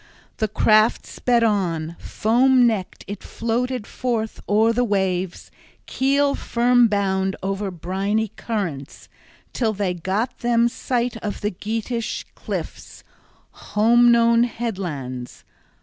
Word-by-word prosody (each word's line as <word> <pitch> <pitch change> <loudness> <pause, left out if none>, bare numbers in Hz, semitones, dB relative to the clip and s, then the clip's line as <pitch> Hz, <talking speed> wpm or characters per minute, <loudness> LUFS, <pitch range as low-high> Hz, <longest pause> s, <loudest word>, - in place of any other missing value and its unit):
The 220 - 0
craft 215 +1 +3
sped 240 -2 +1
on, 170 -7 0
foam 250 +3 +3
necked 215 -6 -1
it 205 0 -6
floated 240 +1 -2
forth 230 -3 -3
o'er 220 +3 +4
the 245 +2 +1
waves, 190 -4 -1 0.3
keel 280 +1 +1
firm 245 0 +3
bound 195 -2 0
over 195 +1 -2
briny 195 +5 -2
currents, 180 - -5 0.5
till 225 -3 0
they 195 -3 -1
got 190 +8 -2
them 235 -1 +3
sight 245 -1 -2
of 210 -2 -5
the 210 - -1
Geatish 225 +4 -3
cliffs, - - -7 0.5
home 235 +3 +3
known 235 0 +4
headlands. 170 - -5
220 Hz, 115 wpm, -22 LUFS, 190-235 Hz, 0.5 s, o'er